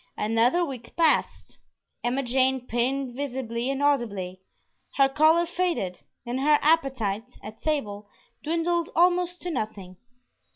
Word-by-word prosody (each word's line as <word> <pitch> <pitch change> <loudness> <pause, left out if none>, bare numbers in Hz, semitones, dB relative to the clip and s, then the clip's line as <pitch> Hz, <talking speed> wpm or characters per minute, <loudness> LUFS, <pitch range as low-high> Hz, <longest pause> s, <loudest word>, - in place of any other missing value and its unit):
Another 230 +11 +2
week 250 -6 -9
passed. 325 -2 +1 0.4
Emma 250 +3 0
Jane 260 0 +1
pined 255 +2 -1
visibly 255 -3 -3
and 275 +1 -1
audibly. 205 -10 0 0.5
Her 275 -1 +5
color 315 +5 +4
faded, 340 - -2 0.3
and 245 +2 -3
her 295 +2 +4
appetite 255 -8 0
(at 215 +1 -9
table) 210 -10 -3 0.3
dwindled 335 +2 0
almost 355 +1 +2
to 355 - -3
nothing. 195 - -5
265 Hz, 120 wpm, -26 LUFS, 230-315 Hz, 0.5 s, Her